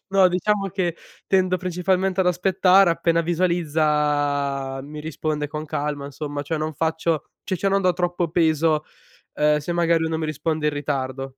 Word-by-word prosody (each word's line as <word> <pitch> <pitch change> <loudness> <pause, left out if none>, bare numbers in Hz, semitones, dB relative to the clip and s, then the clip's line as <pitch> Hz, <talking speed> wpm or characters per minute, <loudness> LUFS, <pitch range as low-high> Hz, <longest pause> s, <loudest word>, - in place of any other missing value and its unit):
No, 190 -1 +5
diciamo 195 +3 0
che 175 -3 -2 0.3
tendo 185 -1 +2
principalmente 185 +1 0
ad 185 - +2
aspettare, 185 +1 +4
appena 170 0 +1
visualizza 150 -5 0
mi 150 +2 -8
risponde 155 -1 -3
con 150 +2 -5
calma 145 -1 -3
insomma, 145 +1 -5
cioè 155 +2 -3
non 155 +1 -2
faccio 160 0 -1 0.2
ci 190 - -2
cioè 195 - +1
non 195 0 +2
do 185 -1 +3
troppo 175 -1 -1
peso, 160 -2 +2 0.5
uhm, 150 0 +3
se 150 +4 -4
magari 170 -1 +2
lui 160 0 -1
non 160 0 -2
mi 160 - -2
risponde 155 0 -2
in - - -1
ritardo. 135 -2 -3
160 Hz, 170 wpm, -23 LUFS, 150-180 Hz, 0.5 s, No